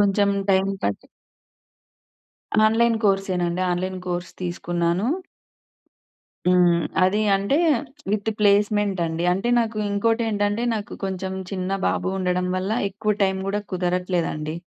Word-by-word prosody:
కొంచెం 200 0 +3 0.2
టైమ్ 190 0 +3
పట్టింది. 100 - -2 1.6
Online 230 +1 +3
కోర్సేనండి. 185 -3 +1
Online 185 +1 -2
course 175 0 -3
తీసుకున్నాను. 175 +2 -1 1.4
హ్మ్. 175 -2 +4 0.2
అది 205 +3 +1
అంటే, 200 +8 +2 0.5
విత్ 210 +1 0
ప్లేస్‌మెంట్ 205 -1 +3
అండి. 165 +1 -3
అంటే, 195 +6 -1
నాకు 225 -2 0
ఇంకోటేంటంటే, 210 0 0
నాకు 210 -2 -4
కొంచెం 190 0 -3 0.2
చిన్న 190 0 -2
బాబు - - -1
ఉండడం 180 -1 0
వల్ల 185 +2 -2 0.2
ఎక్కువ 210 +2 -1
టైమ్ 190 -1 +1
గూడా 205 +1 0
కుదరట్లేదండి. 175 -4 -1
190 Hz, 110 wpm, -23 LUFS, 180-205 Hz, 1.6 s, హ్మ్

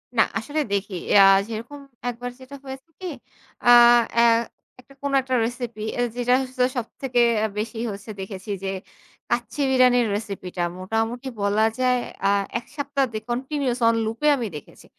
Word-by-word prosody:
না, 220 - +5 0.2
আসলে 290 +7 -3
দেখি 200 0 -2 0.3
আ - - +9 0.2
যেরকম 230 +6 -7 0.3
একবার 245 +1 -5
যেটা 260 +2 -11
হয়েছে 265 +4 -9
কি? 375 - -8 0.6
আ - - -2 0.5
অ্যা 235 - +5 0.6
একটা 255 +2 -17
কোন 280 0 -2
একটা 260 0 -2
রেসিপি, 235 -2 -5
অ্যা - - -1
যেটা 245 0 +1
হচ্ছে 255 -1 -2
সবথেকে 245 +1 -2 0.4
বেশি 220 +2 -3
হচ্ছে, 200 +2 -9
দেখেছি 190 +1 -6
যে, 195 - -2 0.6
কাচ্চি 240 +4 -2
বিরিয়ানির 250 -2 +4
রেসিপিটা। 195 -4 -4 0.2
মোটামুটি 225 +6 -2
বলা 205 +2 +2
যায়, 250 -1 +3 0.3
আ - - +4 0.3
১ 245 - -17
সপ্তাহ 280 -1 0
যে, 215 - -2
কন্টিনিউয়াস 260 +1 -1
অন 230 - +4
লুপ 225 +1 -4
এ - - +6
আমি 240 -3 -2
দেখেছি। 150 - -11
240 Hz, 155 wpm, -23 LUFS, 220-260 Hz, 0.6 s, আ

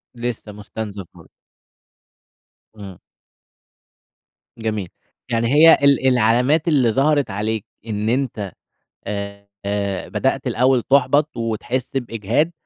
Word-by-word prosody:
لسه 120 -3 -5
مستنزف 105 -1 -7
برضو. - - -17 1.4
امم. 100 -4 -10 1.6
جميل، 110 -4 -3 0.4
يعني 115 -1 +1
هي 160 +2 +8
ال 140 -1 +4
العلامات 125 +6 +3
اللي 140 -7 +3
ظهرت 140 0 +2
عليك 105 +1 -2 0.2
إن 105 0 -2
أنتَ 115 -6 -2 0.6
آآ، 100 0 -5 0.6
بدأت - - -1
الأوَّل 125 +1 +2
تحبط 140 +2 +2
وتحس 115 +4 -2
بإجهاد، 120 - -1
115 Hz, 95 wpm, -20 LUFS, 105-135 Hz, 1.6 s, هي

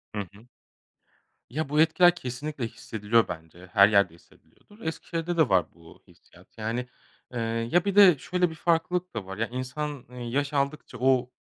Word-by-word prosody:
Hı 105 - -1
hı. 100 +4 -12 1.1
Ya, 150 +3 -3
bu 150 +2 +2
etkiler 175 +2 +5
kesinlikle 130 -2 -5
hissediliyor 115 -2 0
bence. 85 +2 -9
Her 100 -1 +7
yerde 100 -5 +3
hissediliyordur. 205 - -23
Eskişehir'de 165 0 -4
de 160 -5 +4
var 95 -2 +3
bu 85 -1 -17
hissiyat. - - -21
Yani, 115 +3 -3 0.4
eee, 120 - -4 0.3
ya 175 +2 +4
bir 200 - -1
de 185 -8 +8
şöyle 180 +4 0
bir 160 - -8
farklılık 175 +2 0
da 105 -4 -5
var: 95 0 -7
Ya 115 - 0
insan, 130 +3 -5
eee, 125 - -12
yaş 140 +3 -1
aldıkça 140 -1 -2
o 125 -1 +2
130 Hz, 170 wpm, -27 LUFS, 110-160 Hz, 1.1 s, de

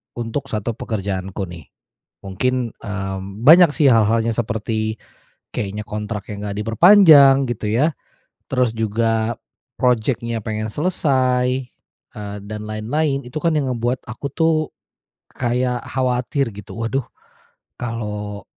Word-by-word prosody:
untuk 120 +4 -4
1 110 +1 -2
pekerjaanku 95 -3 -4
nih. 85 -3 -11 0.6
Mungkin, 120 +5 -1
eee, 95 -2 -4 0.3
banyak 170 0 +9
sih 145 - +4
hal-hal 115 0 +4
seperti 110 -1 -2 0.6
kayaknya 105 +1 -3
kontraknya 105 0 -5 0.2
nggak 100 - -6
diperpanjang 140 - +7
gitu 110 -3 -3
ya, 145 +9 +2 0.6
terus 125 -3 +1
juga 110 +1 0 0.5
projeknya 115 -1 +1
pengen 110 -1 -3
selesai, 130 - +1 0.5
eee, 105 -1 -6
dan 105 0 -6
lain-lain. 135 +6 -1
Itu 125 +5 -5
kan 165 - +2
yang 135 -3 0
ngebuat 120 +2 -2
aku 120 +5 -5
tuh, 160 -1 +2 0.8
kayak 125 0 -1
khawatir 130 +1 0
gitu, 105 -1 -10
"Waduh, 125 +4 -1 0.8
kalau 105 -3 -5
115 Hz, 115 wpm, -20 LUFS, 105-130 Hz, 0.8 s, banyak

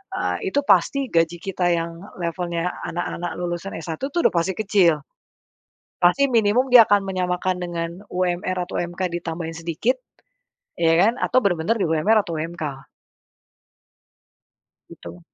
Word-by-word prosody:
eee, 410 - -2
itu 380 - +1
pasti 255 +5 +2
gaji 165 0 +2
kita 185 -2 -1
yang 165 0 -2 0.3
levelnya 170 0 -2 0.2
anak-anak 175 0 -4
lulusan 175 +2 -4
S1 165 0 -5
tuh 345 - -1
udah - - +4
pasti 175 +2 0
kecil. 185 -8 +2 1.0
Pasti 275 +11 +3
minimum 235 +3 +2
dia 235 -3 +9
akan 205 -1 +4
menyamakan 185 -1 -1
dengan 170 -1 -3 0.2
UMR 180 0 -1
atau 180 - -5
UMK 175 +1 -3
ditambahin 165 -1 -5
sedikit, 170 - -1 0.8
ya 165 -1 +3
kan? 225 +6 +3
Atau 255 - +2
bener-bener 175 +1 +1
di 180 - +1
UMR 200 +8 +3
atau 170 -4 -5
UMK. 155 -4 -5 2.0
Gitu. 85 +1 -11
175 Hz, 135 wpm, -22 LUFS, 165-200 Hz, 2.0 s, dia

